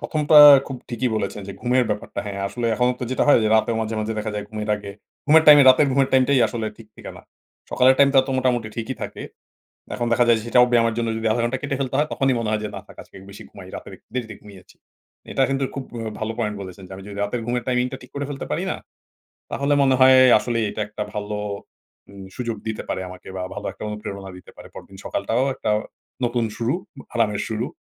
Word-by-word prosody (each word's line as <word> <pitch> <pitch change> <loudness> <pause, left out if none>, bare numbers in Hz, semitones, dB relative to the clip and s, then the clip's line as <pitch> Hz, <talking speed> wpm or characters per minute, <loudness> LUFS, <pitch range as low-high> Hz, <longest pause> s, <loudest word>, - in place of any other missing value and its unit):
১ম 155 - -2
টা 155 - +8 0.3
খুব 135 - -6
ঠিকই 125 +2 -1
বলেছেন 105 - -3
যে - - -5
ঘুমের 125 0 +2
ব্যাপারটা। 105 - -4
হ্যা, 100 - -4 0.2
আসলে 115 +4 -3
এখনো 125 +1 +2
তো 125 - -2
যেটা 130 - 0
হয় - - +7
যে 110 - +2
রাতে 110 - +2
মাঝে, 110 0 -3
মাঝে 110 +1 -2
দেখা 110 0 -3
যায় 105 - -4
ঘুমের 105 -1 -5
আগে 100 -1 -9 0.4
ঘুমের 160 +2 +6
টাইমে 145 -1 +9
রাতের 135 +3 +6
ঘুমের 135 0 +2
টাইমটাই 130 0 +4
আসলে 110 0 -4
ঠিক 115 - -14
থাকেনা। - - -10 0.5
সকালের 130 +1 +4
টাইমটা 140 -1 +5
তো - - -4
মোটামুটি 120 -4 0
ঠিকই 115 +3 -4
থাকে। - - -6 0.7
এখন 120 - -2
দেখা 120 +1 +4
যায় 115 - +6
যে 110 - -9
সেটাও 125 +1 +5
ব্যায়ামের 115 -1 +3
জন্য 115 - -1
যদি 110 - -5
১/২ 120 +1 0
ঘন্টা 125 +2 -1
কেটে 140 -1 -2
ফেলতে 130 -1 -2
হয় 150 - +2
তখনই 135 -2 +1
মনে 115 -2 -2
হয় 110 - 0
যে, 105 - -2
"না 100 - -6
থাক - - -15
আজকে - - -22
বেশি 100 - -11
ঘুমাই - - -13
রাতের - - -9
একটু - - -40
দেরিতে 120 -3 -4
ঘুমিয়েছি।" 100 -3 -16 0.6
এটা 135 - +1
কিন্তু 135 0 -1
খুব 135 - -4
ও - - -5 0.2
ভালো 110 +1 -2
পয়েন্ট 105 -2 -1
বলেছেন 95 0 -10
যে - - -16
আমি 95 - -11
যদি 100 - -9
রাতের 115 +3 -3
ঘুমের 120 0 -2
টাইমিং 125 0 +1
টা - - -4
ঠিক 125 - -15
করে 140 - -3
ফেলতে 140 - -6
পারি - - -1
না। - - -4 0.7
তাহলে 140 +1 -1
মনে 135 -1 +3
হয় 130 0 +7 0.2
আসলেই 115 +1 -2
এটা 105 - -6
একটা 105 - -5
ভালো 105 0 -4 0.7
উম 100 -1 -11
সুযোগ 120 -3 -3
দিতে 110 -1 -3
পারে - - -2
আমাকে 90 0 -12
বা 90 - -4
ভালো - - -6
একটা - - -13
অনুপ্রেরণা 100 -2 -7
দিতে 90 - -15
পারে। - - -12
পরদিন 95 - -12
সকালটাও 120 +3 -1
একটা 110 - -3 0.5
নতুন 120 0 0
শুরু 120 +5 -1 0.2
অব - - -10
আরামের 110 -3 0
শুরু। 110 +3 -2
120 Hz, 230 wpm, -22 LUFS, 105-130 Hz, 0.7 s, টাইমে